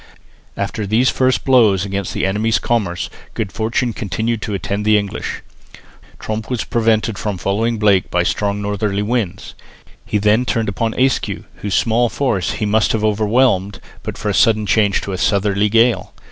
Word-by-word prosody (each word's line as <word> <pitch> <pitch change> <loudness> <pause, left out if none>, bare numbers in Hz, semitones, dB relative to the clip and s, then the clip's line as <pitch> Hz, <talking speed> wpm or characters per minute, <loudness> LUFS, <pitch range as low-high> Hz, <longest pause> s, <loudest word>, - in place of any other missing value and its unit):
After 105 -2 -3
these 115 +5 +3
first 130 -1 +1
blows 110 -8 +4
against 100 -1 -3
the - - 0
enemy's 105 +4 +1
commerce 100 -7 -1 0.3
good 105 -4 -3
fortune 115 +2 -1
continued 110 +4 -2
to 105 - -3
attend 100 +1 -3
the 105 0 +4
English. 100 -1 -4 0.8
Tromp 110 0 -4
was 125 -3 -1
prevented 110 -2 0
from 105 -3 -3
following 110 +6 0
Blake 100 -3 +2
by 90 0 +1
strong 100 +2 -1
northerly 100 0 -1
winds. 105 -5 -2 0.5
He - - -1
then 105 +3 +3
turned 115 -4 -1
upon 110 +3 -2
Ayscue, 130 0 0
whose 100 -2 -2
small 120 +1 +2
force 110 -8 -1
he 105 0 -2
must 110 +1 +2
have 110 -1 -1
overwhelmed, 105 -2 +1 0.2
but - - -6
for 110 - -3
a - - 0
sudden 110 0 +3
change 105 -1 +2
to 100 - -5
a 95 - -4
southerly 100 +2 +1
gale. 115 +2 +2
105 Hz, 170 wpm, -18 LUFS, 100-115 Hz, 0.8 s, blows